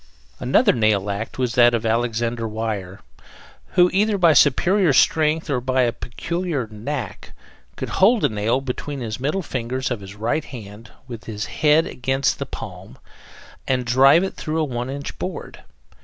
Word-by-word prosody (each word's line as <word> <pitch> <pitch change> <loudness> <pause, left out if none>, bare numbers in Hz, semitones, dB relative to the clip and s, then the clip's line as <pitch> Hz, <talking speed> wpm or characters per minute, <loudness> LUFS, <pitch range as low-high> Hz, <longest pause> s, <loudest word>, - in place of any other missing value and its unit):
Another 135 - +3
nail 105 -4 +1
act 100 +3 -5
was 125 -2 -1
that 120 -1 +5
of 115 0 -3
Alexander 115 0 -1
Weyer, 105 -3 -4 0.7
who, 180 -1 +6
either 205 +2 +2
by 170 -4 +5
superior 175 +5 +4
strength 155 +4 +3
or 135 -5 -1
by 130 0 +1
a 120 - +2
peculiar 155 +3 -3
knack, 115 +6 -6 0.4
could - - -5
hold 220 +3 +5
a - - +3
nail 110 +4 0
between 135 +2 -5
the 110 -3 -4
middle 150 +9 -1
fingers 130 -1 -3
of 120 -4 -3
his 100 +1 -10
right 115 +9 -1
hand 110 -2 -10 0.2
with 115 -3 -8
the 110 -2 -7
head 150 +8 +2
against 135 +2 -1
the - - -4
palm, - - -9 0.7
and 130 -1 0
drive 135 +7 +5
it 190 - -3
through 155 +1 -3
a - - +2
one 125 -3 -3
inch 140 +1 -6
board. 185 - -6
125 Hz, 165 wpm, -22 LUFS, 115-150 Hz, 0.7 s, who